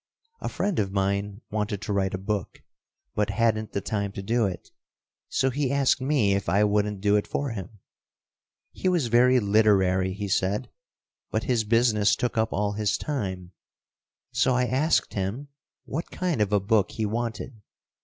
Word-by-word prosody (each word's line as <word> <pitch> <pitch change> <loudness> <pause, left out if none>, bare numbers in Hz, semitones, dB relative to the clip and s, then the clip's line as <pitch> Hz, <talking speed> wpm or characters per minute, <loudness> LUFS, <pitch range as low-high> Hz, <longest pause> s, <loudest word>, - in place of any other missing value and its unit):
A - - -3
friend 200 -4 -1
of 100 -2 0
mine 100 +1 -1
wanted 105 -1 -2
to 105 - -2
write 95 -1 0
a - - -3
book, 100 0 -4 0.5
but 105 0 0
hadn't 110 0 0
the 100 - -1
time 100 -1 -2
to 95 - -6
do 115 +1 +1
it. 90 - -7 0.6
So 130 0 +1
he 140 0 -1
asked 140 -1 +2
me 130 -8 +2
if 100 0 -1
I 100 +2 +3
wouldn't 105 -1 +1
do 105 0 +3
it 105 - -1
for 140 -2 -2
him. 105 0 -7 0.9
He 185 - -1
was 175 -7 +1
very 125 +2 +5
literary, 100 -3 +3
he 100 +1 -4
said, 95 +1 0 0.6
but - - -1
his 120 -5 +1
business 110 -2 +3
took 125 - -2
up 110 0 +1
all 105 0 0
his 105 0 0
time, 95 -11 -4 0.8
so 130 - +2
I 125 0 +2
asked 135 +6 +1
him 105 +9 -3 0.4
what 160 +5 -4
kind 175 -10 -1
of 105 -1 +1
a 105 - +4
book 100 0 +1
he 110 - -1
wanted. 115 +1 -4
105 Hz, 175 wpm, -26 LUFS, 100-120 Hz, 0.9 s, very